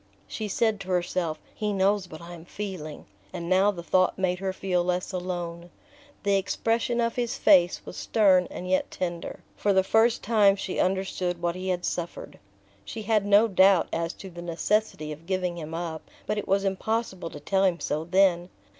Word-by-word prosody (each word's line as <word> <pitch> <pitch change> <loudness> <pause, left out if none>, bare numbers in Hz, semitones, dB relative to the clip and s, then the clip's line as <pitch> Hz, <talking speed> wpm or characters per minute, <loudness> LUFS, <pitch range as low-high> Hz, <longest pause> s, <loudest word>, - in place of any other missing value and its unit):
She 215 - -4
said 220 +1 +1
to 195 - -9
herself: 180 -3 -1 0.2
"He 210 -1 -2
knows 195 -1 +1
what 155 - -10
I 175 +1 -9
am 165 -2 -10
feeling..." 180 -5 -7 0.3
and 170 -2 -5
now 190 +3 +4
the 175 -4 -4
thought 185 +1 +2
made 180 -1 0
her 190 0 -1
feel 185 -2 -1
less 180 +1 -1
alone. 175 -2 -4 0.5
The 200 -1 +3
expression 230 +4 0
of 230 0 0
his 240 -2 -1
face 180 -4 +4
was - - -9
stern 190 -5 +3
and 180 - -7
yet 185 0 +1
tender: 175 -2 -5
for 205 - +1
the 190 0 +4
first 225 +4 +3
time 205 -3 +4
she 195 -1 -4
understood 185 -2 -1
what 170 0 -1
he 185 +1 -5
had 180 -1 -1
suffered. 170 -1 -5 0.4
She 220 - -7
had 210 -1 +1
no 205 +3 +6
doubt 190 -2 +4
as 165 0 -1
to 190 - -10
the 175 0 -9
necessity 175 -1 -1
of 155 +3 -10
giving 180 -2 -1
him 160 0 -6
up, 165 -2 -4 0.2
but 210 0 -1
it - - -6
was 195 +1 +2
impossible 195 -2 -2
to 145 - -9
tell 190 +6 +1
him 180 -3 +2
so 150 +1 -2
then. 180 0 +3
185 Hz, 190 wpm, -26 LUFS, 175-200 Hz, 0.5 s, no